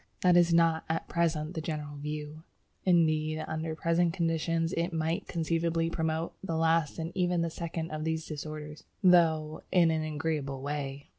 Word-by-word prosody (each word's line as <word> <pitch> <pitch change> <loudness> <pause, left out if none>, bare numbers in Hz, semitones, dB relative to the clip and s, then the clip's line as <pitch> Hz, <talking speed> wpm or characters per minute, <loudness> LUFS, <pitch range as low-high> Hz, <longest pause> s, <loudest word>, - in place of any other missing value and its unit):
That 180 -1 +5
is 175 -1 +5
not 165 -1 +4
at 165 0 -1
present 160 -1 0
the 160 - -3
general 150 -2 -4
view. 150 +1 -6 0.4
Indeed, 155 -3 +2
under 160 0 -3
present 165 +1 +1
conditions 165 -1 0
it 170 +2 -1
might 165 +1 -1
conceivably 165 0 0
promote 160 0 -1
the 165 -4 -2
last 165 -2 +2
and 165 +1 -4
even 180 -2 +1
the 165 - -2
second 165 -1 -4
of 155 0 -3
these 160 0 -1
disorders, 150 0 -7 0.2
though 160 -4 +4
in 170 -3 +5
an 160 -1 0
agreeable 150 -3 -2
way! 140 -1 -4
160 Hz, 160 wpm, -30 LUFS, 155-170 Hz, 0.4 s, That